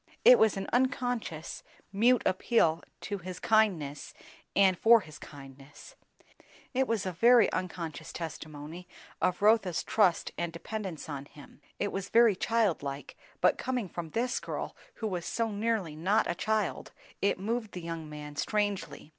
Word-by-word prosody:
It - - +9
was 220 -3 +4
an 195 - -4
unconscious, 245 -9 -1 0.3
mute 240 +5 +4
appeal 180 -4 +2 0.2
to 205 -1 -4
his 180 0 -7
kindness 185 -11 +1 0.4
and 190 -2 +5
for 230 +5 +6
his 155 -4 -12
kindness; 140 - -13 0.8
it 265 0 +1
was 225 -4 -1
a 185 - -1
very 235 +6 +5
unconscious 170 -4 -4
testimony 160 +1 -7 0.3
of 180 +2 0
Rotha's 210 -5 +3
trust 195 -6 +2
and 170 -1 -2
dependence 185 0 -6
on 140 -2 -5
him; 145 0 -16 0.2
it 205 - -1
was 195 -1 -4
very 230 -3 +5
child 220 -3 +1
like, 140 0 -6 0.3
but - - +3
coming 250 -5 -2
from 170 -1 -6
this 240 +8 -1
girl - - -5 0.2
who 220 - -3
was 180 -4 -3
so 230 +4 -1
nearly 205 -6 -1
not 185 +7 +2
a - - -1
child, 215 +3 -2 0.3
it 200 - +2
moved 220 +2 -3
the 180 - -6
young 165 -2 -6
man 150 -1 -8
strangely. 200 -5 -2
190 Hz, 155 wpm, -30 LUFS, 160-220 Hz, 0.8 s, It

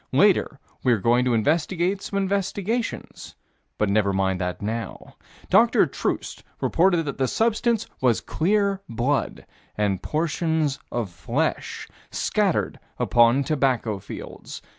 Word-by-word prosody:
Later - - +3 0.2
we're 120 -3 +4
going 120 +5 +2
to 125 -2 +2
investigate 170 - +1
some 200 - -4
investigations 200 +4 -2 0.4
but 105 - +1
never 100 0 +2
mind 95 -1 0
that 90 0 -3
now. 110 +2 -5 0.4
Dr. - - +5
Troost - - -3 0.2
reported 175 -1 +3
that 140 -2 -5
the 130 - +2
substance 225 - +1 0.2
was 125 -4 +3
clear 200 +2 0
blood 125 +5 -1 0.3
and 100 -3 0
portions 160 - 0
of 115 -6 -2
flesh 85 -1 -2 0.2
scattered - - 0 0.2
upon 120 +3 +4
tobacco 130 -7 0
fields. - - -9
135 Hz, 120 wpm, -24 LUFS, 110-185 Hz, 0.4 s, Dr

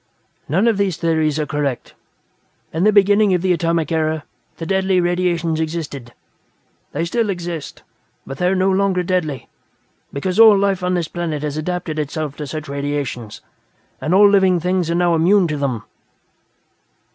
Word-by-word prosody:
"None 190 - +2
of 225 -3 +2
these 195 -5 0
theories 160 -3 0
are 155 - -1
correct. 145 -4 -3 0.8
In 165 +5 0
the 215 - +5
beginning 205 -1 +4
of 180 - -2
the 185 -1 +3
Atomic 165 -2 -1
Era, 155 -1 0 0.3
the 165 - -6
Deadly 190 +1 +1
Radiations 175 -2 0
existed. 155 -7 -5 0.8
They 165 +4 -2
still 225 +5 -1
exist, 175 -5 -5 0.4
but 135 - -8
they 180 - +2
are 190 - +2
no 190 +1 +2
longer 190 -1 +1
deadly, 170 -7 -2 0.6
because 185 +8 -2
all 220 -3 +8
life 195 -2 0
on 180 0 0
this 170 -3 -1
planet 165 -4 -4
has 150 -1 -3
adapted 155 -1 -3
itself 150 -1 -3
to 150 - -5
such 155 +1 -6
radiations, 140 -5 -4 0.6
and 165 +4 +1
all 205 +1 +7
living 190 -3 +3
things 180 0 -1
are 170 - 0
now 175 0 +2
immune 175 +3 +3
to 150 - -2
them." 135 -6 -2
170 Hz, 165 wpm, -19 LUFS, 155-185 Hz, 0.8 s, all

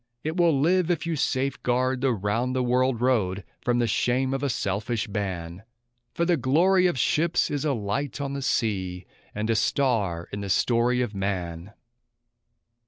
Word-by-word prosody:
It 155 +2 -2
will 170 -6 +3
live 175 +4 +2
if 170 -2 0
you 165 -1 -1
safeguard 130 -2 0
the 135 -1 +2
round 115 +4 -1
the 130 - +1
world 125 -1 +1
road 100 -7 +1 0.2
from 120 -1 +1
the 120 - +2
shame 130 +3 +1
of 135 - -2
a 140 - 0
selfish 110 +1 -2
ban; 95 -4 -4 0.5
For 170 - -1
the 175 -1 +2
glory 175 +8 +3
of 175 - -1
ships 160 +7 +1
is 145 0 -2
a 145 - +2
light 125 +7 -3
on 140 -1 -3
the 140 - -3
sea, 95 -8 -1 0.3
and 105 +1 -2
a 115 - +1
star 105 -11 0
in 100 - -4
the 100 - -5
story 120 +5 +2
of 115 -4 -4
man! 95 -2 -4
125 Hz, 170 wpm, -25 LUFS, 100-140 Hz, 0.5 s, will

